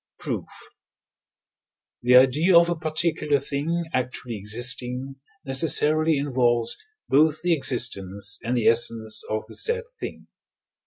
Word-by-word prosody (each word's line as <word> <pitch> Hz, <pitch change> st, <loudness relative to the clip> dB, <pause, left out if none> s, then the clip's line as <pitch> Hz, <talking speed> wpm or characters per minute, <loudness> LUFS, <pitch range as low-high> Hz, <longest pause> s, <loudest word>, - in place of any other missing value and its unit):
Proof. -, -, -5 dB, 1.5 s
The 125 Hz, +1 st, +3 dB
idea 145 Hz, +8 st, +5 dB
of 170 Hz, 0 st, +4 dB
a -, -, 0 dB
particular 155 Hz, -2 st, -1 dB
thing 150 Hz, +5 st, -3 dB
actually 125 Hz, -2 st, -3 dB
existing 125 Hz, +5 st, 0 dB, 0.3 s
necessarily 155 Hz, +3 st, +2 dB
involves 120 Hz, -4 st, 0 dB, 0.3 s
both 155 Hz, +3 st, +2 dB
the 175 Hz, -1 st, +2 dB
existence 100 Hz, -, -1 dB
and 125 Hz, +2 st, -1 dB
the 115 Hz, -, -1 dB
essence 115 Hz, -2 st, +2 dB
of 110 Hz, 0 st, -3 dB
the 110 Hz, -, -14 dB
said 470 Hz, +1 st, 0 dB, 0.2 s
thing -, -, -7 dB
(II. -, -, -30 dB
130 Hz, 120 wpm, -24 LUFS, 120-155 Hz, 1.5 s, idea